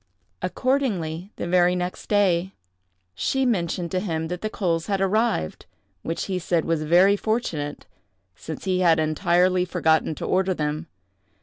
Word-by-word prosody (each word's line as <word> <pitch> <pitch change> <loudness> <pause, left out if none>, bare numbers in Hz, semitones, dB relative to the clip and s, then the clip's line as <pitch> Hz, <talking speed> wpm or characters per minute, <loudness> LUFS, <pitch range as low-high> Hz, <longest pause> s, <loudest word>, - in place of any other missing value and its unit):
Accordingly, 200 - -1
the - - -4
next 180 0 +1
day, 190 -3 +2 0.6
she 265 - 0
mentioned 175 -6 -1
to 185 - 0
him 160 -4 -3
that 180 0 -4
the 215 - -2
coals 170 -6 -1
had 200 -2 0
arrived; 195 - 0 0.3
which 165 +8 -3
he 185 -2 -2
said 170 -2 0
was 165 -2 0
very 180 +6 +5
fortunate, 185 -10 -2 0.5
since 155 - -8
he 185 -1 0
had 170 -3 +4
entirely 175 +3 +2
forgotten 160 -3 +1
to - - -5
order 185 0 +1
them. 150 +1 -3
180 Hz, 140 wpm, -24 LUFS, 160-195 Hz, 0.6 s, very